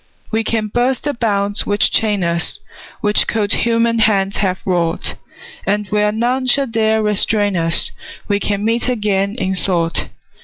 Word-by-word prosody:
We 225 0 0
can 220 0 -1
burst 245 +4 0
the 290 - -1
bonds 205 -3 -1
which 205 0 +2
chain 210 -4 +1
us, 170 0 -2 0.4
Which 210 0 +2
cold 215 -2 0
human 230 0 +2
hands 200 -3 +2
have 185 -3 0
wrought, 175 -3 0 0.5
And 205 +1 +1
where 210 0 +2
none 245 +4 0
shall 275 +2 +3
dare 220 -2 +1
restrain 210 -1 +1
us 165 -1 +1 0.4
We 205 -1 +1
can 205 0 -1
meet 230 +2 +1
again, 205 -3 0
in 190 -5 -1
thought. 175 -3 +1
210 Hz, 155 wpm, -17 LUFS, 195-225 Hz, 0.5 s, shall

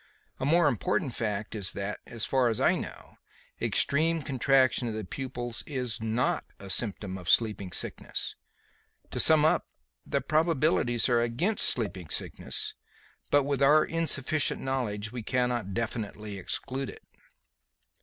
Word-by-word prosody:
A - - -1
more 170 +1 +4
important 120 -1 0
fact 105 -2 -3
is 100 -4 0
that, 100 +1 -4
as 115 -2 -2
far 130 -2 +2
as 110 - -2
I - - +4
know, - - -7 0.4
extreme 160 +2 +3
contraction 130 -2 +2
of 110 - -3
the 110 -2 -4
pupils 120 +1 -5
is 125 -7 -3
not 125 +9 0
a 100 -1 -5
symptom 95 -1 -1
of 90 -1 -6
sleeping 105 -5 +3
sickness. - - -4 0.8
To - - -3
sum 155 -1 +6
up, 155 - +2 0.4
the - - -1
probabilities 155 -6 +2
are 120 -2 +3
against 130 - +2
sleeping 100 -8 -1
sickness, - - -3 0.6
but 145 0 +4
with 140 0 -1
our 150 +3 +6
insufficient 155 -2 0
knowledge, 110 -6 -2
we 125 -1 -5
cannot 120 -4 -1
definitely 110 -3 -4
exclude 130 +7 -3
it." - - -11
120 Hz, 140 wpm, -28 LUFS, 105-140 Hz, 0.8 s, sum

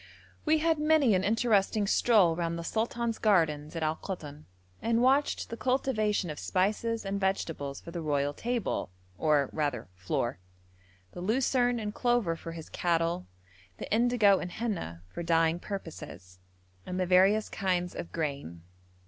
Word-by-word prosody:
We 315 0 +4
had 320 0 +1
many 300 -6 +4
an 185 0 +2
interesting 215 -1 +2
stroll 200 -5 +4
round 170 0 -2
the 170 - -5
sultan's 230 +3 -2
gardens 160 -7 +2
at 165 - -2
Al 155 +1 0
Koton, 150 -6 -7 0.4
and 230 0 +1
watched 270 0 +2
the - - -3
cultivation 215 - 0
of 150 - -7
spices 215 +4 0
and 200 0 -2
vegetables 165 -7 -2
for 170 - -10
the 170 -1 -4
royal 145 -2 0
table, 235 - -2 0.3
or 150 -4 +2
rather 145 -9 -2
floor; 95 +4 -2 0.7
the 175 - -8
lucerne 245 +3 +1
and 210 -1 -4
clover 240 -9 +1
for 165 0 -8
his 165 -2 -8
cattle, 170 +1 0 0.5
the - - -4
indigo 225 -4 +4
and 175 - -6
henna 190 - -4
for 130 - -7
dyeing 165 0 +2
purposes, 160 - -8 0.4
and 180 0 -4
the 185 - +1
various 190 +4 +4
kinds 180 -3 -1
of - - -7
grain. 140 - -4
185 Hz, 150 wpm, -29 LUFS, 160-225 Hz, 0.7 s, We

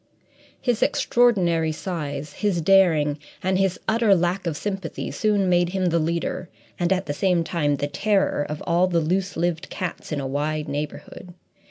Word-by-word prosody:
His 245 -4 0
extraordinary 175 -10 +2
size, 150 -4 -5
his 205 -5 0
daring, 160 -5 +4 0.2
and 185 0 +1
his 195 -2 +1
utter 220 -2 +4
lack 175 +1 0
of 155 -3 -2
sympathy 195 -3 -4
soon 205 -3 +1
made 175 -1 +3
him 190 0 -1
the 170 0 +2
leader 170 +2 -2 0.3
and, 175 0 +1
at 190 -1 +1
the 145 - -2
same 180 +2 +1
time, 150 -4 0
the 140 - -2
terror 195 +3 +1
of 150 0 -5
all 175 +2 +3
the 175 -2 +1
loose 185 +4 -1
lived 170 0 -1
cats 180 -3 -5
in 150 - -1
a 135 - -3
wide 150 +3 -2
neighbourhood. 150 +4 -6
175 Hz, 170 wpm, -23 LUFS, 155-190 Hz, 0.3 s, daring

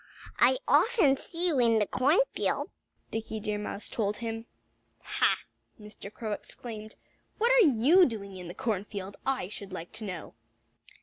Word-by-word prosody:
"I 260 - +5
often 390 - +4
see 335 +5 -2
you 290 -6 +1
in 230 -2 +4
the 210 - +3
cornfield," 295 - +1 0.4
Dickie 220 0 -4
Deer 210 0 -2
Mouse 210 0 -5
told 210 -2 -1
him. 225 0 -5 0.6
"Ha!" - - +1 0.4
Mr. 210 -1 -10
Crow 220 0 -5
exclaimed. 215 0 -7 0.4
"What 470 +3 +3
are - - +7
you 295 +9 +5
doing 200 -5 -6
in 180 -2 -8
the 175 - -8
cornfield, 200 -2 -3
I 265 -9 0
should 200 -1 -8
like 175 -2 -7
to 225 - -7
know?" 180 -5 -6
220 Hz, 150 wpm, -29 LUFS, 205-270 Hz, 0.6 s, are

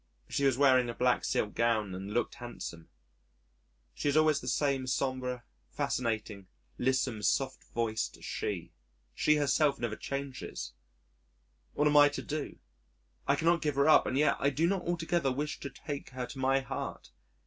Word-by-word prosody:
She 140 - 0
was 135 -3 +3
wearing 130 -3 +5
a 115 - -4
black 125 0 +2
silk 105 - 0
gown 110 -4 +1
and 95 +2 -6
looked 120 +3 0
handsome.... 120 -10 -8 1.0
She 145 - -1
is 145 - +2
always 155 -2 +4
the 125 - -8
same 135 0 +1
sombre, 130 -1 -1 0.3
fascinating, 110 -5 -2 0.3
lissom, 130 -3 +1
soft 135 +4 0
voiced 110 -2 -2
She! - - -3 0.4
She 155 - +3
herself 145 0 +2
never 115 -2 -2
changes.... 135 - -5 1.0
What 150 - +1
am 150 0 +4
I 145 0 +8
to 145 - -5
do? 150 -1 -4 0.7
I - - +4
cannot 170 +1 +2
give 150 -3 0
her 140 +2 +3
up 155 - +6
and 130 - -1
yet 150 0 +3
I 140 - +3
do 145 +4 +1
not 185 0 0
altogether 170 -4 0
wish 145 +3 -3
to 140 - -5
take 140 +2 -6
her 130 -1 -4
to 135 - -9
my 135 +1 +2
heart. 135 0 -6
135 Hz, 165 wpm, -31 LUFS, 120-145 Hz, 1.0 s, I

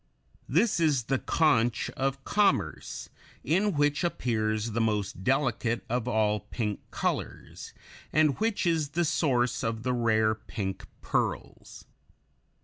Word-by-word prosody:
This 225 -6 +2
is 150 -7 +2
the 135 +2 0
conch 120 -8 +2
of 135 0 -2
commerce, 195 - 0 0.3
in 190 +8 +2
which 145 +2 +2
appears 110 -8 -1
the 115 +2 0
most 105 -4 -1
delicate 125 -2 0
of 120 0 -1
all 110 -3 +2
pink 105 -3 -4
colors, - - -4 0.4
and 155 -3 +3
which 220 -3 0
is 160 -4 +1
the 175 - +3
source 130 -6 +1
of 115 0 -2
the 125 0 0
rare 110 -2 +2
pink 100 -3 -5
pearls. - - -3
125 Hz, 125 wpm, -28 LUFS, 110-150 Hz, 0.4 s, and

